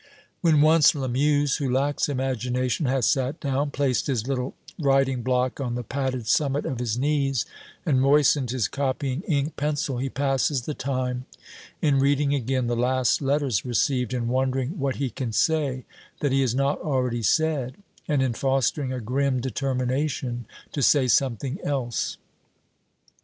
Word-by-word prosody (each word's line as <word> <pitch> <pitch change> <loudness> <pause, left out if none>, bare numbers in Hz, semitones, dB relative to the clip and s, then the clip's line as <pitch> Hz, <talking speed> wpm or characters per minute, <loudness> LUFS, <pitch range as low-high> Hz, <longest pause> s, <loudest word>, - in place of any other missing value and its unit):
When 160 -4 +4
once 155 0 +6
Lamuse 145 +2 +1
who 135 -3 -1
lacks 140 +3 +1
imagination 130 +1 -1
has 130 -2 +1
sat 135 +4 +1
down, 140 0 -1
placed 140 -3 0
his 125 -4 -1
little 130 -1 -2 0.2
writing 135 -3 +2
block 125 +1 0
on 120 -3 -2
the 125 - -3
padded 130 0 -3
summit 140 +3 +1
of 130 - -3
his 120 -2 -1
knees, 135 -3 +1 0.4
and 135 -6 +2
moistened 140 -1 +4
his 125 -3 0
copying 135 0 -2
ink 150 -2 0
pencil, 145 -3 -1
he 135 +2 -2
passes 135 0 0
the 150 - -3
time 130 -2 -3 0.6
in 145 -3 +3
reading 140 +1 +2
again 130 -1 0
the 120 0 0
last 125 +2 +1
letters 140 -5 +1
received, 125 0 0
in 120 -2 -2
wondering 130 +5 -1
what 135 -1 -1
he 135 -3 -2
can 120 +1 -4
say 140 0 0 0.4
that 145 - +1
he 135 +1 +3
has 125 -3 +1
not 140 +2 +1
already 125 -5 -1
said, 145 -1 +1 0.3
and 145 -5 +2
in 130 -2 0
fostering 135 +2 0
a 130 - -3
grim 130 +3 0
determination 130 -1 -2 0.2
to 145 - -3
say 135 0 +4
something 135 - +1
else. 130 -5 -2
135 Hz, 155 wpm, -25 LUFS, 125-140 Hz, 0.6 s, once